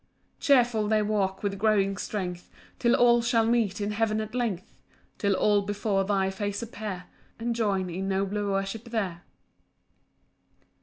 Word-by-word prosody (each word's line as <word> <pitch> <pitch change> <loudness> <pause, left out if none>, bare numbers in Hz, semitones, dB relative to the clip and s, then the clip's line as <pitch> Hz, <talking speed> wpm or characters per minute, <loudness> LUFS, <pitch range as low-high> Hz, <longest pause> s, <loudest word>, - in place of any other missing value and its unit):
7 280 - +5
Cheerful 225 -3 -2
they 215 0 +2
walk 195 -2 -1
with 200 -1 -2
growing 200 -2 +2
strength, 180 -3 -4 0.3
Till 235 -1 +3
all 240 -1 +5
shall 230 -1 +2
meet 225 -3 +1
in 205 0 -1
heaven 215 0 0
at 215 0 -5
length, 225 -8 -3 0.4
Till 200 -2 +2
all 205 +1 +3
before 205 -1 0
thy 195 -1 +1
face 205 +2 -3
appear, 210 -5 -6 0.3
And 235 +1 -2
join 200 -5 0
in 185 +2 -4
nobler 200 +1 -1
worship 195 +3 -2
there. 200 -7 -3
205 Hz, 150 wpm, -27 LUFS, 195-225 Hz, 0.4 s, 7